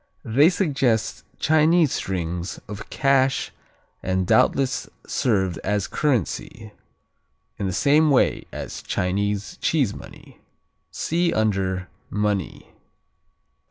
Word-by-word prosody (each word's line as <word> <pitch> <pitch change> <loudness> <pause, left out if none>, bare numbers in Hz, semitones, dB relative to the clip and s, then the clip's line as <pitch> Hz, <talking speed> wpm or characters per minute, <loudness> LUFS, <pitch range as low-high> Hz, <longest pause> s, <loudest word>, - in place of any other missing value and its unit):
They 140 +8 +5
suggest 135 - 0
Chinese 155 0 +4
strings 90 -1 -3
of 105 0 -8
cash 135 -2 +2 0.5
and 95 0 0
doubtless 130 +3 +2 0.2
served 95 -7 0
as 105 -2 -1
currency, 115 - -2 0.9
in 100 - -1
the - - -1
same 150 - +3
way 135 - +2
as - - -6
Chinese 100 +2 -2
cheese 135 -10 +1
money. - - -13 0.5
(See 170 +1 0
under 95 -4 0 0.2
Money.) 105 -3 -2
110 Hz, 95 wpm, -23 LUFS, 95-140 Hz, 0.9 s, They